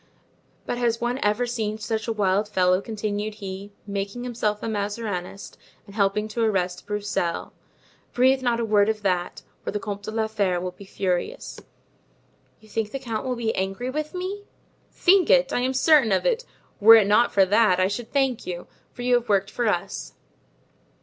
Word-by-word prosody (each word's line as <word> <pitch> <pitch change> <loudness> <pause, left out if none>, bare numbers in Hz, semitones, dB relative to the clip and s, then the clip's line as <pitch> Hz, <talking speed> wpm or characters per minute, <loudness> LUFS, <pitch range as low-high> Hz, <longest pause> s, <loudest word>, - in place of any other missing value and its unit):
But 245 - -3
has 230 -1 +1
one 240 +2 -1
ever 210 +4 +1
seen 220 -3 -2
such 220 +1 -3
a - - 0
wild 205 -1 +1
fellow," 185 -2 +2
continued 210 -1 -3
he, 195 -1 -7
"making 200 +3 -4
himself 220 -4 -2
a - - -2
Mazarinist 205 -3 -4 0.3
and 200 - -14
helping 205 +1 +1
to 230 +2 -3
arrest 185 -5 -1
Broussel! 205 -4 -2 0.6
Breathe 260 +2 +3
not 240 -2 +1
a 230 - 0
word 210 -1 +3
of 215 -1 -2
that, 180 -2 -1 0.2
or - - -3
the 210 - -2
Comte 205 -1 -5
de 205 - -7
la 220 0 0
Fere 200 -5 0
will 180 +1 -4
be 200 +2 -14
furious." 190 - -3 1.0
"You 215 - -19
think 215 0 -2
the 275 - -4
count 235 -2 -4
will 250 - -1
be 230 -2 -1
angry 195 +7 -2
with 305 +4 -4
me?" 385 +3 -4 0.5
"Think 370 -1 +4
it? 270 +1 +4
I'm 255 +1 +1
certain 275 -4 +5
of 190 - +1
it; - - +1 0.3
were 225 +2 +9
it 220 -3 +6
not 210 +4 +4
for 195 -1 +4
that, 205 -1 +3
I 185 - +3
should 220 +4 -5
thank 270 -4 0
you, 175 -1 -5 0.3
for 245 - -8
you 250 0 +2
have 240 - -16
worked 200 0 +2
for 240 -2 -1
us. 195 -1 -2
215 Hz, 185 wpm, -24 LUFS, 200-240 Hz, 1.0 s, were